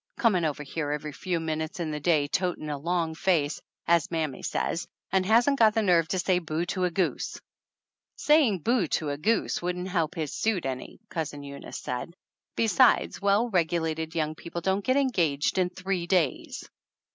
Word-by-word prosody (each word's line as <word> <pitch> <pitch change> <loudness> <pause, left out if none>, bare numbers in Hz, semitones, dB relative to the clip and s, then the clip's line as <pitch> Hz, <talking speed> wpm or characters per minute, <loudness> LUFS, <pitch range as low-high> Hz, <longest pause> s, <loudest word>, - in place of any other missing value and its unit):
"Coming 190 -8 +3
over 150 -1 -2
here 145 +1 -3
every 150 +1 -3
few 175 +4 -2
minutes 160 +1 -3
in 160 -3 -2
the 150 - -3
day, 150 -2 +2
'totin' 175 -2 -1
a 145 - -2
long 170 +1 -1
face,' 160 -4 +1 0.2
as 170 -2 +3
mammy 155 -5 -2
says, 170 - -2 0.2
and 190 -1 +3
hasn't 240 +6 +4
got 220 -1 +5
the 225 - +2
nerve 170 -4 +4
to 190 - -1
say 180 0 +2
boo 160 0 -2
to 185 -2 0
a - - +1
goose 180 +2 -1 0.4
!" - - -66 0.3
"Saying 280 - +3
boo 230 -2 +2
to 150 0 -1
a 145 - -3
goose 220 +8 +1
wouldn't 180 +1 -3
help 170 -2 0
his 155 -4 -3
suit 215 -8 0
any," 130 -1 -5
Cousin 145 -3 -4
Eunice 140 0 -8
said; 125 +7 -5 0.4
"besides, 230 +1 +3
well 200 +4 +2
regu 170 -2 +2
lated 160 0 -3
young 155 -1 0
people 170 +2 -7
don't 190 +3 0
get 255 +5 +2
engaged 175 - +1
in 180 -1 +2
three 185 -1 -3
days 175 -8 0
170 Hz, 185 wpm, -27 LUFS, 155-190 Hz, 0.4 s, got